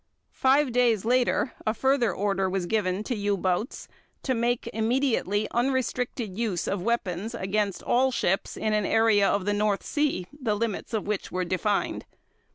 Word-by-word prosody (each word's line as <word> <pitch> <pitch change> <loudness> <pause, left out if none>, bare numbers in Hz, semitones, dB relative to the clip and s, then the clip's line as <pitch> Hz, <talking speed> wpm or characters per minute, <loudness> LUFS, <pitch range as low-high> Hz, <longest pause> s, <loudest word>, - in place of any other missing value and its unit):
Five 270 +1 +3
days 235 -4 +2
later 250 +1 +2
a 215 - +1
further 265 -1 +2
order 195 -1 0
was 185 -1 -1
given 195 0 0
to 245 - -2
U 205 -1 0
boats 185 +5 -2 0.4
to 260 - 0
"make 240 0 0
immediately 225 -3 +1
unrestricted 245 -4 -1
use 210 -6 -1
of 200 -2 -1
weapons 215 0 -2
against 200 -1 -1
all 260 +2 +2
ships" 195 -5 -1
in 215 -1 0
an 210 -2 +1
area 225 -3 +4
of 200 -2 0
the 205 - +1
North 205 -1 0
Sea, 290 - 0
the 255 -8 -1
limits 225 +1 -3
of 215 - -2
which 210 -1 -3
were 185 0 -1
defined. 195 +3 -1
215 Hz, 165 wpm, -26 LUFS, 195-245 Hz, 0.4 s, area